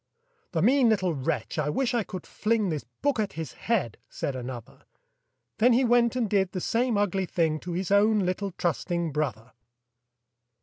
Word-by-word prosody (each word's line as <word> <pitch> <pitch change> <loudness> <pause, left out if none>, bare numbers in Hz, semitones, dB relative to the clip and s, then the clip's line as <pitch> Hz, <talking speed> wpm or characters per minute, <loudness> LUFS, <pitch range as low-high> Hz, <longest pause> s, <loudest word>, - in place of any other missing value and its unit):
"The 160 - +1
mean 255 +2 +5
little 185 -5 +1
wretch, 135 -2 -2
I 150 -1 0
wish 250 - 0
I 240 - +2
could 185 -3 -7
fling 215 -2 0
This 155 -3 -3 0.2
book 285 -4 +2
at 210 -2 -1
his 160 -1 -6
head!" 195 - -1
said 140 - -3
another; 125 -2 -8 0.7
Then 240 +2 +5
he 255 +2 +3
went 240 0 +3
and 245 -3 +1
did 195 -2 +1
the 185 - -2
same 235 +4 +1
ugly 195 -2 0
thing 160 -3 0
To 175 +2 -6
his 185 +2 -3
own 210 +2 +5
little 185 +2 -1
trusting 170 +2 -1
brother! 130 -6 -3
190 Hz, 175 wpm, -27 LUFS, 155-225 Hz, 0.7 s, mean